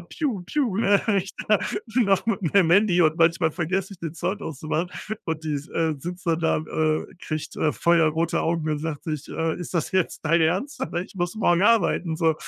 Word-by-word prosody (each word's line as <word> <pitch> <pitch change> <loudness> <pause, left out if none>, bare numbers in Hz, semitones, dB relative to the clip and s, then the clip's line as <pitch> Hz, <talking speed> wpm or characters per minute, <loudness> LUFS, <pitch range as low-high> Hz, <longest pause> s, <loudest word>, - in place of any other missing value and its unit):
ne, - - -14 1.0
wenn 210 -3 +2
ich 190 +1 -4 0.2
da 210 -1 +5 0.4
noch 200 -6 +2
mit 225 -3 0
meinem 185 -5 +4
Handy 190 -1 +4
und 155 -1 +3
manchmal 165 -1 +3
vergesse 185 +3 -2
ich, 190 - -12
den 165 -1 -5
Sound 190 +5 -3
auszumachen 160 +3 -3 0.3
und 160 -1 -4
die 155 -1 -1
s 145 +2 -5
äh, 160 -2 0
sitzt 175 +5 -7
dann 165 0 +1
da, 165 - +2
äh, 155 0 -1
kriegt, 155 -4 -5
äh, 155 - +1
feuerrote 165 -1 +2
Augen 165 -1 -1
und 150 - -1
sagt 155 -2 -4
sich, 155 -2 -4
äh: 160 -1 -2
„Ist 175 +1 -7
das 165 - -1
jetzt 185 -2 0
dein 165 +2 +3
Ernst? 190 - 0
Dann, - - -2
ne, 175 - -2
ich - - -17
muss 175 -1 -2
morgen 175 -4 +3
arbeiten“, 195 -6 +2
so. 160 -2 +2
170 Hz, 205 wpm, -24 LUFS, 160-185 Hz, 1.0 s, da